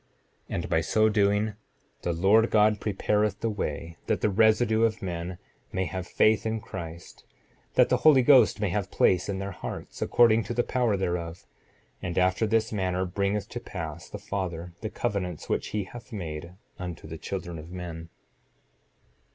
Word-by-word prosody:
7:32 - - -3
And - - -2
by 80 - +2
so 110 +6 +3
doing, 105 0 +2 0.5
the 85 - -1
Lord 100 +7 +4
God 105 0 +4
prepareth 105 0 0
the 115 - 0
way 85 -4 -4
that - - 0
the 105 - +2
residue 110 +2 +4
of 115 -1 +1
men 90 0 -4 0.3
may 95 - -1
have 95 0 -5
faith 110 0 +3
in 110 0 -1
Christ, 85 -6 -9 0.5
that - - +5
the - - +3
Holy 145 -5 +6
Ghost 125 -6 +6
may 105 -2 0
have 95 +1 -2
place 90 +1 +2
in 100 - -1
their 95 +1 -4
hearts, 90 - -7
according 115 -2 +5
to 115 - -4
the 120 - +2
power 120 -5 +1
thereof; 85 -2 -3 0.6
and 90 -1 -4
after 95 +4 +2
this 110 0 +1
manner 95 -2 0
bringeth 100 +2 -1
to - - -5
pass - - -7
the - - -6
Father, 90 -3 -4
the 110 - -3
covenants 100 -8 -3
which - - 0
he 105 -1 -2
hath 120 +6 -11
made 85 -4 -6 0.3
unto 90 -4 -6
the 80 0 -7
children 85 -2 -5
of 80 +2 -10
men. 85 -2 -7
100 Hz, 175 wpm, -27 LUFS, 90-110 Hz, 0.6 s, Holy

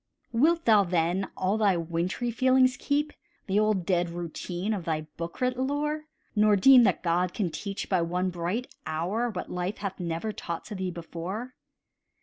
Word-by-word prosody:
Wilt 320 +8 +3
thou, 215 -3 +6
then, 175 +1 0
all 195 +4 +1
thy 200 -4 +3
wintry 170 +8 -2
feelings 255 +2 +4
keep, 290 +2 -1 0.3
The 195 +1 +2
old 210 -4 +1
dead 175 -2 +1
routine 175 +4 -4
of 195 -4 -3
thy 155 -2 0
book 170 0 -6
writ 250 0 +1
lore, 300 +3 -1 0.3
Nor 210 0 +5
deem 255 +6 +8
that - - +1
God 175 +1 +1
can 185 -6 -1
teach, 195 +5 -5
by 185 -3 +2
one 180 +2 -1
bright 180 +10 -3
hour, 190 +10 -1
What 205 - -5
life 180 +3 -2
hath 195 -1 -5
never 170 +4 -2
taught 170 -5 -5
to 215 - -7
thee 190 -2 -2
before? 180 +8 -6
195 Hz, 170 wpm, -28 LUFS, 175-235 Hz, 0.3 s, deem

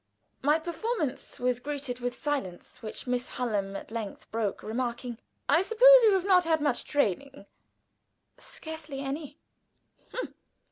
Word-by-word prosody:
My 295 +3 +4
performance 335 - -3
was 250 -1 +1
greeted 275 -2 -4
with 245 0 -3
silence, 275 -12 -3
which 215 - -6
Miss 250 0 -1
Hallam 205 -5 -2
at - - -7
length 220 -3 -6
broke, 220 -3 -2
remarking: 240 +1 -3 0.3
"I 320 +4 +5
suppose - - +8
you 430 -3 +6
have 380 -1 +1
not 370 -2 +6
had 325 -2 +2
much 290 -4 0
training?" 280 - -1 0.9
"Scarcely 315 -3 -7
any." 285 +2 -5
275 Hz, 130 wpm, -29 LUFS, 240-320 Hz, 0.9 s, suppose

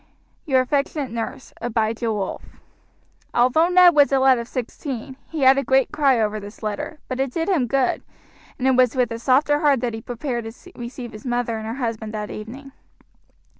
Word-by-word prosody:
Your 260 -3 +4
affectionate 275 0 -1
nurse, 230 +3 -5
ABIJAH 225 0 -1
WOLF." 200 -3 -3 0.9
Although 255 +7 +4
Ned 360 -1 +7
was 290 -2 +5
a 270 - +4
lad 265 -2 +4
of 235 - -6
sixteen, 260 +1 -5
he 320 -3 -4
had 265 +1 +6
a - - -2
great 265 -2 +2
cry 280 -5 +3
over 215 -1 0
this 205 +2 -11
letter, 215 +8 -4
but 255 0 -4
it 270 -1 0
did 325 +4 -2
him 325 -11 +2
good, 270 0 +1 0.6
and 260 - 0
it - - +5
was 255 0 +3
with 250 -2 +1
a 230 - -4
softer 285 +4 +3
heart 285 -5 +3
that 240 -2 -1
he 225 - -6
prepared 240 0 -4
to 360 +10 -17
receive 240 0 -7
his 215 -1 -11
mother 240 -2 -1
and 220 - -6
her 225 - -4
husband 225 -4 -4
that 210 -1 -4
evening. 260 +6 -8
250 Hz, 195 wpm, -22 LUFS, 230-275 Hz, 0.9 s, Ned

